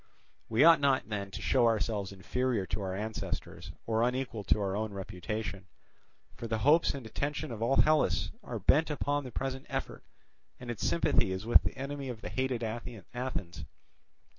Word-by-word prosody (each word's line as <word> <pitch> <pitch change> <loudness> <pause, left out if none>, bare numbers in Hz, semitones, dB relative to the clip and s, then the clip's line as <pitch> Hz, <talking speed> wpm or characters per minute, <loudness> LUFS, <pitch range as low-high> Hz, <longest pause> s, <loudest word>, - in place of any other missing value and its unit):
We 115 +5 +4
ought 165 0 +8
not 135 -4 +2
then 100 -2 -3
to 95 - -7
show 125 -3 +4
ourselves 105 -3 0
inferior 115 +2 -1
to 105 - -3
our 95 -1 -3
ancestors, 110 +2 -4
or 110 0 +1
unequal 125 -3 -1
to - - +3
our 100 -1 -1
own 110 0 -2
reputation. 100 +1 -5 0.7
For 115 - -6
the 110 0 0
hopes 155 +2 +5
and 135 -4 -7
attention 140 +5 -3
of 115 -2 -6
all 120 +4 +2
Hellas 155 0 +3
are - - -5
bent 160 +4 +3
upon 145 -1 0
the 125 - -7
present 135 +1 -4
effort, - - -4 0.6
and 125 -1 -5
its 115 - -5
sympathy 85 +2 +2
is 95 +3 -3
with 120 - +7
the - - -4
enemy 140 0 -4
of 115 -3 -6
the - - -5
hated 130 -2 -1
Athens. 115 - -5
115 Hz, 175 wpm, -31 LUFS, 100-130 Hz, 0.7 s, ought